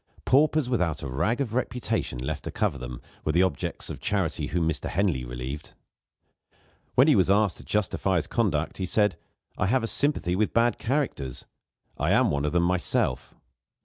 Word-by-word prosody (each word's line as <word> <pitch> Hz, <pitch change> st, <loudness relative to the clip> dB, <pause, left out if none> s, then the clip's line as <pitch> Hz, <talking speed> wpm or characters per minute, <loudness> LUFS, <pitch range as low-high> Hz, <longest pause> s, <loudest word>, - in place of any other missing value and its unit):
Paupers 150 Hz, +1 st, +3 dB
without 90 Hz, -12 st, 0 dB
a -, -, -3 dB
rag 90 Hz, -, 0 dB
of 115 Hz, -5 st, -2 dB
reputation 120 Hz, -, -1 dB
left 65 Hz, +5 st, -4 dB
to -, -, -3 dB
cover 70 Hz, -, -1 dB
them, 60 Hz, 0 st, -7 dB, 0.2 s
were 75 Hz, -, 0 dB
the 90 Hz, +3 st, +4 dB
objects 90 Hz, -7 st, -2 dB
of -, -, -7 dB
charity -, -, -1 dB
whom 85 Hz, 0 st, 0 dB
Mr. 80 Hz, -4 st, -2 dB
Henley 90 Hz, -8 st, 0 dB
relieved. 60 Hz, +5 st, -6 dB, 1.2 s
When 130 Hz, +4 st, +6 dB
he 150 Hz, -, +6 dB
was 95 Hz, -2 st, +3 dB
asked 100 Hz, -2 st, +3 dB
to -, -, -10 dB
justify 95 Hz, -2 st, 0 dB
his 80 Hz, -4 st, +1 dB
conduct, 85 Hz, -5 st, 0 dB
he 95 Hz, -, -2 dB
said: 105 Hz, -1 st, +2 dB, 0.4 s
"I -, -, +2 dB
have 125 Hz, +3 st, +2 dB
a -, -, 0 dB
sympathy 140 Hz, -10 st, +1 dB
with 105 Hz, +2 st, 0 dB
bad 115 Hz, -1 st, +3 dB
characters 115 Hz, -, -2 dB, 0.5 s
I -, -, +2 dB
am -, -, +4 dB
one 70 Hz, 0 st, 0 dB
of 75 Hz, -, 0 dB
them 85 Hz, 0 st, +2 dB
myself." 85 Hz, -7 st, 0 dB
90 Hz, 180 wpm, -26 LUFS, 75-115 Hz, 1.2 s, When